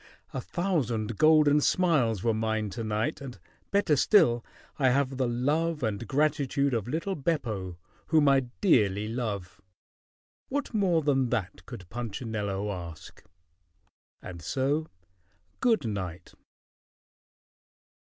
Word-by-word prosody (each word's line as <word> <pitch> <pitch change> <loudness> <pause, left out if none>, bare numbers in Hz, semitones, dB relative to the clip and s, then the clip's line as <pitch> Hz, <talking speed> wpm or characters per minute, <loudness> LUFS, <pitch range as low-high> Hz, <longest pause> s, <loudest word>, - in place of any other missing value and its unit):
A - - -3
thousand 120 - -2
golden 150 -1 +5
smiles 135 - +2
were 115 - +2
mine 110 -1 -1
to 115 +3 -5
night, 110 +8 -2
and 130 -3 -8 0.3
better 200 -6 +2
still 135 - +4 0.4
I 135 -2 +4
have 135 0 +1
the 130 -2 +1
love 150 +6 0
and 110 0 -2
gratitude 140 -1 +1
of 115 -3 -1
little 165 +9 -2
Beppo 110 - -2 0.3
whom 155 -3 +4
I 135 -2 +4
dearly 105 - +3
love. 110 -6 -4 0.9
What 285 -1 -3
more 180 -7 +2
than 135 -3 +2
that 100 -5 -3
could 115 -8 -9
Punchinello 105 -4 -3
ask? 85 -4 -9 1.0
And 85 -2 -8
so 140 - -1 0.7
good 225 - +2
night!" 95 -5 -5
125 Hz, 115 wpm, -28 LUFS, 110-155 Hz, 1.0 s, golden